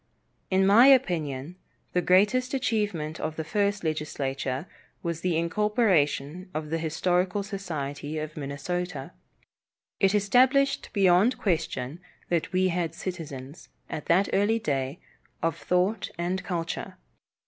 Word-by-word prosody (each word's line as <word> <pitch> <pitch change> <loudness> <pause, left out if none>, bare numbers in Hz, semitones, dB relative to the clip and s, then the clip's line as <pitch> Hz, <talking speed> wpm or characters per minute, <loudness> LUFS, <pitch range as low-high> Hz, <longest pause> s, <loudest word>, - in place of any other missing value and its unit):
In 190 0 +3
my 220 +7 +7
opinion, 170 - +2 0.4
the 180 - +2
greatest 210 +9 +3
achievement 205 - -1
of 155 0 -3
the 160 - -3
first 205 +3 0
legislature 140 -3 -2 0.4
was 170 -2 -3
the 175 -2 +1
incorporation 180 - +1
of 155 0 -4
the 165 - 0
Historical 180 +4 0
Society 155 -7 -5
of 155 0 -5
Minnesota. 150 +3 -4 0.9
It 195 +1 +3
established 260 +7 +3
beyond 195 +4 +4
question 160 - -2 0.3
that 170 -2 0
we 185 0 +2
had 170 -2 -2
citizens, 155 -6 -7 0.2
at 150 - -5
that 185 +4 +4
early 205 +3 +3
day, 140 -5 -2 0.4
of 165 -1 +1
thought 180 +5 0
and 180 +2 -2
culture. 170 -3 -4
175 Hz, 120 wpm, -27 LUFS, 155-200 Hz, 0.9 s, my